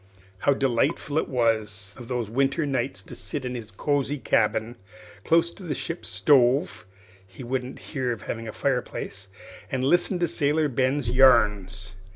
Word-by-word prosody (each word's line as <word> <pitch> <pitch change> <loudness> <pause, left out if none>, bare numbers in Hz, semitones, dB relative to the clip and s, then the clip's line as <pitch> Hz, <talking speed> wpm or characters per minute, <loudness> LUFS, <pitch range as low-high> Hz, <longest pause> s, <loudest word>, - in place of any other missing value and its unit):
How 140 +7 +3
delightful 135 +4 +1
it - - -3
was 110 -6 -1
of 120 -2 -11 0.2
winter 135 +7 +1
nights 120 -8 -2
to - - -11
sit 145 -4 -5
in 125 - -3
his 115 -3 -6
cosey 145 +6 -1
cabin, 115 -1 0 0.5
close 165 +1 +3
to 195 - -14
the 165 -6 -3
ship's 170 +6 -4
stove 135 - +3 0.4
(he 95 +7 -11
wouldn't 125 +1 -3 0.2
hear 130 -4 -1
of 115 -3 -5
having 115 0 -5
a - - -4
fireplace), 120 -6 -3 0.4
and 130 -1 -1
listen 175 +6 +2
to 175 -1 +1
Sailor 150 0 +1
Ben's 130 0 0
yarns! 105 -7 +3
130 Hz, 155 wpm, -25 LUFS, 115-145 Hz, 0.5 s, How